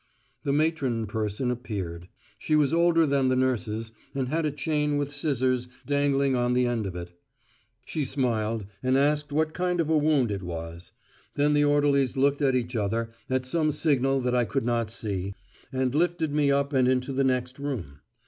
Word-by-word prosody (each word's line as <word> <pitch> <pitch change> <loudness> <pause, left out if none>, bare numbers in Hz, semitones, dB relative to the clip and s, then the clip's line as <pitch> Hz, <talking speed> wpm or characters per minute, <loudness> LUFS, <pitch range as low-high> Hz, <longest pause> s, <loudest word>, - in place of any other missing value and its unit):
The 140 - 0
matron 140 -6 +1
person 110 +3 -2
appeared. 95 -8 -5 0.3
She 155 - +1
was 150 0 +3
older 170 -1 +4
than 140 -2 +2
the 130 - +2
nurses, 115 -3 -1 0.2
and 130 -2 -1
had 160 +1 0
a - - -1
chain 150 0 0
with 145 0 -2
scissors 130 -4 0 0.2
dangling 140 -1 +2
on 125 0 +1
the 125 0 +3
end 120 -4 -1
of 90 - -6
it. 85 0 -6 0.7
She 155 - -2
smiled, 115 -5 -1 0.2
and 130 +1 +2
asked 145 +1 +1
what 155 +1 +1
kind 180 -1 -1
of 160 -2 +1
a 160 - +4
wound 145 -6 +2
it 100 -2 -3
was. 85 -1 -7 0.4
Then 145 +1 +3
the 145 0 +4
orderlies 145 -3 +2
looked 140 +2 +2
at 135 -2 +3
each 125 0 -2
other, 115 +2 -1 0.2
at 130 0 0
some 155 +3 +1
signal 135 -3 +1
that 125 0 0
I 125 -1 +3
could 135 +1 -2
not 120 -2 0
see, 100 -3 -4 0.4
and 130 -1 0
lifted 165 -1 +1
me 145 -1 +2
up 140 +1 +1
and 130 -2 +3
into 130 +1 +1
the 135 +1 +1
next 125 0 -1
room. 110 - -5
130 Hz, 185 wpm, -27 LUFS, 115-145 Hz, 0.7 s, older